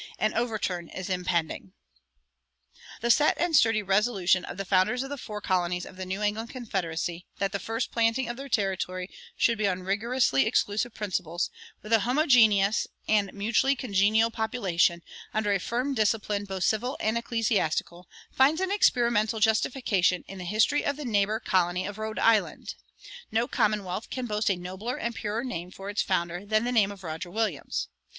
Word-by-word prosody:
An 215 - 0
overturn 210 -8 -2
is 190 0 -6
impending. 170 - -2 1.3
The 235 +1 +3
set 300 +5 +4
and 345 -2 +1
sturdy 225 -5 +4
resolution 195 -2 +2
of - - -8
the 195 - -4
founders 200 +7 +2
of 270 - -8
the 285 - -4
four 210 -2 -6
colonies 180 -2 0
of - - -12
the 185 0 -6
New 190 +3 -3
England 215 +2 -1
confederacy 180 -7 -4
that 195 -2 -1
the 200 - -2
first 225 +3 -3
planting 230 +2 +1
of 240 - -4
their 275 +2 -8
territory 185 -3 -1 0.3
should 230 -2 +2
be 210 - +2
on 185 -1 -2
rigorously 205 - +1
exclusive 220 +3 0
principles, 180 -4 -2 0.3
with 215 +2 -3
a 225 - +6
homogeneous 225 -5 +4 0.2
and 205 -3 +2
mutually 230 +7 +1
congenial 220 -1 +2
population, 185 -7 0 0.3
under 210 -2 +1
a 195 - +1
firm 250 +8 -2
discipline 210 -3 0
both 190 -2 -4
civil 245 +8 0
and 220 +1 0
ecclesiastical, 215 -7 -1 0.2
finds 280 +5 +3
an 380 0 -1
experimental 235 - +2
justification 215 -4 +2
in 195 - -9
the 180 - -6
history 215 +9 +2
of 285 0 -1
the 300 - -6
neighbor 210 -1 +1
colony 180 0 +1
of 205 +1 -6
Rhode 220 0 -4
Island. 225 -2 +2 0.6
No 230 +2 +1
commonwealth 210 -4 -1
can 255 -1 -4
boast 210 -2 0
a 195 - +2
nobler 190 +7 -5
and 235 - -3
purer 220 +1 -3
name 180 -9 -5
for 195 +2 -7
its 205 - 0
founder 175 -1 -1
than 215 +2 +1
the 245 - -1
name 210 -5 +3
of 195 -2 -11
Roger 160 +1 -5
Williams. 205 -6 -2
210 Hz, 170 wpm, -27 LUFS, 185-230 Hz, 1.3 s, a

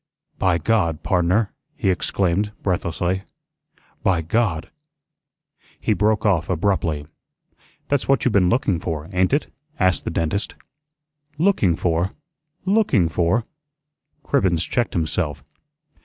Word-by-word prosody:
"By 90 -3 +3
God, 85 -3 +1
pardner," 95 +4 +1 0.2
he 110 - +1
exclaimed, 95 +3 0
breathlessly. 90 0 -1 0.8
"By 90 -4 +2
God 85 -3 0 0.5
" - - -36
he 110 - +1
broke 105 +2 +1
off 95 -7 +2
abruptly. 85 -4 0 0.8
"That's 145 -2 0
what 135 -1 +2
you 125 - +3
been 95 -4 +4
looking 100 - +1
for, 80 -2 -4
ain't 95 0 +2
it?" 145 +2 0 0.3
asked 95 -5 +2
the - - -3
dentist. 85 +5 -1 0.8
"LOOKING 155 - +3
for! 85 +3 0 0.5
LOOKING 190 - +3
for!" 85 +8 +1 0.8
Cribbens 95 - +2
checked 120 -1 0
himself. 80 -3 -1
95 Hz, 115 wpm, -22 LUFS, 85-110 Hz, 0.8 s, been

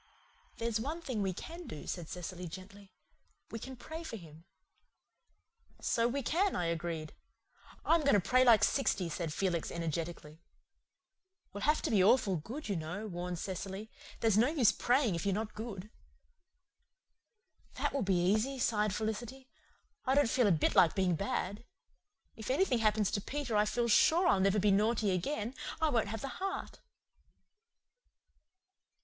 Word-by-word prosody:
"There's 230 -1 -1
one 295 +8 -3
thing 245 -8 -2
we 195 -1 0
can 335 - -8
do," 150 - -8
said 170 -3 -5
Cecily 180 0 -6
gently. 190 +3 -11 0.6
"We 230 - -5
can 260 +3 -8
pray 315 +6 -8
for 320 -8 -6
him." 165 -4 -13 1.3
"So 230 0 +1
we 275 +3 -2
can," 370 - +1
I 175 - 0
agreed. 165 -2 -3 0.7
"I'm 330 0 +4
going 280 -6 +4
to - - +5
pray 255 +7 +3
like 235 -4 +6
sixty," 190 -10 +1
said 165 0 -3
Felix 170 0 -1
energetically. 165 -1 -5 1.1
"We'll 205 - -6
have 300 +2 +2
to - - -1
be 200 -4 +4
awful 200 -3 +4
good, 235 - -7
you 200 - -1
know," 175 +6 -4
warned 180 -2 -4
Cecily. 195 +4 -5 0.3
"There's 220 -2 +3
no 235 - +5
use 280 -7 +4
praying 245 -4 +2
if 170 - -3
you're 200 -2 +1
not 215 +1 -3
good." 210 -2 -7 1.8
"That - - -1
will 280 - 0
be 190 -3 +2
easy," 220 +8 +1
sighed 210 -5 +1
Felicity. 240 +5 -4 0.6
"I 265 - +3
don't 285 -3 +4
feel 240 0 +3
a - - +4
bit 160 -4 +2
like 170 - +5
being 185 -2 +2
bad. 200 +2 -3 0.7
If 220 +1 -7
anything 265 -2 +2
happens 215 -2 +2
to 200 - -1
Peter 270 -1 -3
I 210 0 +4
feel 235 +2 0
sure 330 - +4
I'll 200 - +4
never 195 +2 +3
be 205 0 +3
naughty 210 +1 +2
again. 215 +5 -2 0.3
I 320 - +2
won't 230 -7 +1
have 220 +1 -5
the - - -4
heart." 390 0 -4
210 Hz, 160 wpm, -33 LUFS, 185-250 Hz, 1.8 s, like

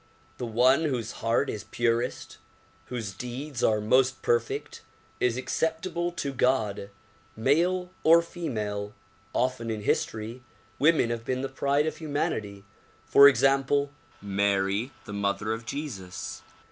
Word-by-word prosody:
The 125 - -3
one 130 +7 +4
whose 125 -7 -2
heart 115 +5 +2
is 105 - -5
purest, 120 +1 -1 0.5
whose 115 -6 -4
deeds 125 +6 -5
are 110 -1 +3
most 130 +5 +2
perfect 120 0 -1 0.4
is 125 -1 +1
acceptable 165 +5 -1
to 140 -5 -3
God, 110 -6 0 0.5
male 175 +10 +1
or 165 +1 +7
female. 105 - -4 0.4
Often 125 -2 -1
in 110 -1 -3
history 110 +4 -1 0.4
women 150 -6 +4
have 115 -1 -3
been 130 +2 -2
the 135 - -2
pride 140 +2 +1
of 155 - -3
humanity; 110 -10 -3 0.4
for 140 - +8
example, 140 +1 +3 0.3
Mary 100 +2 +1 0.2
the 105 - -7
mother 100 +2 -1
of 110 0 -7
Jesus. 110 -12 -6
125 Hz, 125 wpm, -27 LUFS, 110-140 Hz, 0.5 s, for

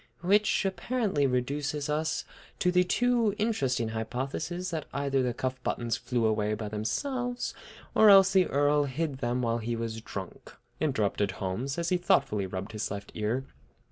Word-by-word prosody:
"Which 200 +3 +3
apparently 195 - 0
reduces 140 +3 -1
us 155 +1 -1 0.3
to 180 - +2
the 180 0 +4
two 235 +2 +2
interesting 135 - 0
hypotheses 135 +11 -3
that 160 -3 -3
either 140 -1 0
the 125 -1 +1
cuff 130 +1 -3
buttons 120 -2 -1
flew 120 -3 -1
away 105 -1 +1
by 105 -1 -5
themselves 245 - -2 0.4
or 220 - +7
else 195 -1 +8
the 185 -2 +5
Earl 145 +1 +3
hid 140 0 -3
them 120 +1 -1
while 115 0 +1
he 115 +1 -2
was 115 -1 -4
drunk," 95 -4 -8 0.2
interrupted 105 -9 0
Holmes, 105 - -3
as 170 -1 -1
he 180 - +3
thoughtfully 135 - +2
rubbed 95 +2 -5
his 110 -1 -3
left 100 0 -6
ear. 115 +5 -1
135 Hz, 160 wpm, -29 LUFS, 115-180 Hz, 0.4 s, else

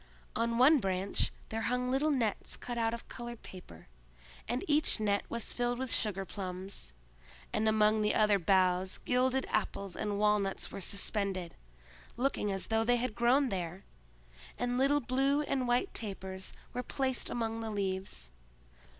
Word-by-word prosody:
On 230 +1 +1
one 280 +5 +7
branch 190 -2 0 0.2
there 225 0 -2
hung 250 +2 0
little 280 +4 +2
nets 240 -8 0
cut 240 - -5
out 225 -1 +1
of 235 0 -6
colored 240 -1 -8
paper, 85 - -11 0.6
and 245 +3 -1
each 300 -4 +3
net 205 -2 +1
was 235 -1 -3
filled 245 0 0
with 260 -1 -2
sugarplums; 190 - -2 0.6
and 220 0 +2
among 215 0 +4
the 210 0 +2
other 210 -2 +4
boughs 185 +1 +2
gilded 255 +1 +1
apples 200 -3 -1
and 210 -1 -2
walnuts 210 -2 +1
were 195 - -6
suspended, 195 -2 -2 0.6
looking 245 -5 0
as 195 -1 -2
though 225 0 +3
they 245 +2 +3
had 240 -1 -2
grown 250 +4 +3
there, 180 -1 -4 0.7
and 245 0 -1
little 275 +3 +3
blue 270 +4 +2
and 265 -3 -1
white 245 +1 +1
tapers 190 -3 -3 0.2
were 250 - -1
placed 260 0 -1
among 225 -1 -2
the 225 - -3
leaves. 190 - -3
220 Hz, 150 wpm, -32 LUFS, 195-250 Hz, 0.7 s, one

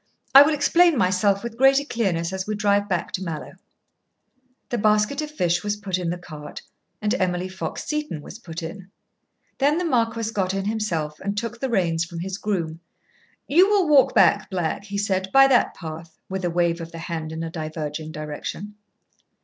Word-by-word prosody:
"I 275 - +12
will 300 +2 +4
explain 335 +2 +4
myself 195 0 +2
with 235 0 -7
greater 270 +1 +5
clearness 190 - -1
as 190 0 -4
we 215 - -1
drive 205 0 +1
back 180 -2 -1
to 190 - -3
Mallowe." 160 -4 -6 1.1
The 240 - -1
basket 215 +7 +2
of 305 - -4
fish 175 - 0
was 205 0 -1
put 195 -3 -2
in 175 -2 -2
the 175 - -2
cart, 155 -4 -10 0.4
and 210 - +1
Emily 180 -1 0
Fox 185 -4 -5
Seton 300 - -3
was 215 - -10
put 170 -6 -7
in. 185 +3 -8 0.7
Then 290 +3 +3
the 360 - -1
marquis 230 -5 0
got 190 -2 0
in 195 0 -2
himself, 170 -9 -2
and 200 +1 -3
took 230 +2 -3
the 265 - -2
reins 170 -7 +1
from 170 -1 -7
his 190 +2 -4
groom. 165 -6 -2 0.7
"You 360 +7 +5
will 400 -5 +3
walk 290 -3 +5
back, 205 - +4
Black," 180 0 -2
he 200 -1 -5
said, 190 -2 -1
"by 270 0 +8
that 255 - +3
path," 160 -1 -9
with 190 0 -4
a 175 - +1
wave 170 0 0
of 165 0 -8
the 165 - -9
hand 165 -2 -5
in 160 +1 -4
a 165 - -5
diverging 155 -1 -5
direction. 155 +6 -6
190 Hz, 190 wpm, -23 LUFS, 170-230 Hz, 1.1 s, I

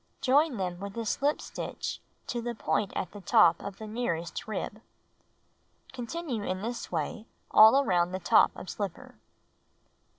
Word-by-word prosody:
Join 280 0 +3
them 180 -2 -3
with 200 +2 -7
a 230 - -2
slip 280 +7 +1
stitch - - -5 0.2
to 240 - -3
the 240 0 -4
point 210 -2 0
at - - -3
the 205 - -10
top 170 -2 +5
of 200 -1 -7
the 220 - -8
nearest 210 -8 -3
rib. 215 0 -4 1.1
Continue 255 0 -4
in 185 0 -3
this 235 +1 -4
way 180 +7 -3 0.2
all 220 +5 +8
around 180 -7 +1
top - - +6
of - - -9
slipper. 195 -1 -6
215 Hz, 145 wpm, -29 LUFS, 185-240 Hz, 1.1 s, all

